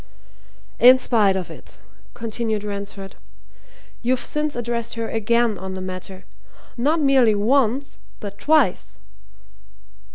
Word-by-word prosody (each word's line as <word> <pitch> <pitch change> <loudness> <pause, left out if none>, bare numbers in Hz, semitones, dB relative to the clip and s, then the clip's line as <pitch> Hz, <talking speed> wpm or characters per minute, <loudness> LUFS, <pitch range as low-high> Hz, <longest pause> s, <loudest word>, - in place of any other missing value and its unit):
"In 255 +2 +8
spite 215 -6 +2
of 185 -2 -4
it," - - -11 0.4
continued 225 -2 -2
Ransford, 200 -1 -6 0.8
"you've 250 +1 +1
since 300 0 -2
addressed 235 -1 -2
her 230 -1 -3
again 225 -1 +1
on 190 0 -6
the - - -5
matter 185 0 -7 0.5
not 295 +7 +1
merely 265 -7 +4
once, 255 +4 +1 0.2
but 200 -1 -8
twice." 310 +1 +2
230 Hz, 110 wpm, -22 LUFS, 200-255 Hz, 0.8 s, In